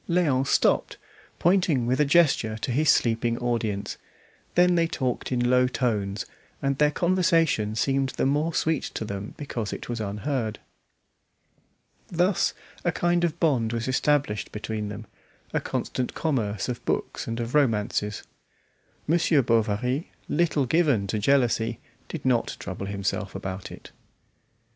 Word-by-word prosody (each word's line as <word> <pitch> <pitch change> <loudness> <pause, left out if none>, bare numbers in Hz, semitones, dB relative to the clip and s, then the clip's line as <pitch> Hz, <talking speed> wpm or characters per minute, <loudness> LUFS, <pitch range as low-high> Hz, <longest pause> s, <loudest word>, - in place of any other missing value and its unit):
Léon 145 -7 +2
stopped, - - +2 0.4
pointing 175 -8 +2
with 125 +3 +1
a 150 - +5
gesture 140 -8 +3
to 120 - -3
his 150 +5 +2
sleeping 115 0 +2
audience; 115 -4 -2 0.6
then 180 0 +5
they 170 -1 +3
talked 130 -6 -2
in 120 -1 +1
low 125 0 +4
tones, 105 -6 -1 0.3
and 140 0 -1
their 150 0 +5
conversation 165 - +2
seemed 135 +3 +1
the - - -1
more 150 +4 +1
sweet 160 -2 +1
to 110 - -5
them 100 0 -6
because 120 -8 -4
it - - -7
was 120 -2 -3
unheard. 110 +2 -2 1.5
Thus 180 +2 +1 0.3
a 175 - +2
kind 175 +1 +1
of 170 0 0
bond 125 -9 +2
was 115 +1 -2
established 130 -5 +1
between 105 0 -4
them, 105 +1 -7 0.5
a - - +2
constant 125 - -3
commerce 110 -10 -1
of 125 -2 -4
books - - -2
and 115 +1 -3
of 115 +1 -4
romances. 105 -6 +1 0.8
Monsieur 160 -3 +3
Bovary, 115 +5 0 0.2
little 160 -3 +1
given 140 -8 +2
to 105 +2 -2
jealousy, 115 -2 +2 0.3
did 160 -5 -7
not 125 -3 +1
trouble 95 +1 -5
himself 100 -1 -3
about 95 0 -5
it. - - -11
125 Hz, 140 wpm, -26 LUFS, 110-150 Hz, 1.5 s, a